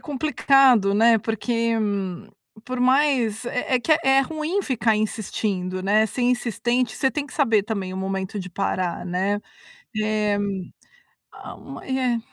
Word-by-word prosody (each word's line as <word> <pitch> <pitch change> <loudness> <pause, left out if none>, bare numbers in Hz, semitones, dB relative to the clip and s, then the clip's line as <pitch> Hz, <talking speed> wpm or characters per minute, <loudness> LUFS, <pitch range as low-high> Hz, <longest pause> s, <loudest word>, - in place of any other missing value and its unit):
complicado, 270 -6 +3
né, 225 +1 +5
porque 230 +2 -1 0.9
por 255 -1 -4
mais 255 -4 +2
é 250 +1 -1
é 245 - -2
que 310 - +2
é 270 0 +4
ruim 315 +7 -2
ficar 230 - +1
insistindo, 200 -3 -2
né, 210 +3 +3
ser 250 - -4
insistente, 245 -1 0
você 265 +2 +1
tem 295 -2 -2
que 280 - -14
saber 225 -9 +2
também 195 -4 -4
o - - -5
momento 190 +1 -3
de 185 -1 -8
parar, 180 -1 -2
né. 190 +3 0 0.6
Eh, 215 -1 0 1.0
a, - - -10
hum - - -10
é 255 -3 -1
230 Hz, 140 wpm, -23 LUFS, 205-260 Hz, 1.0 s, né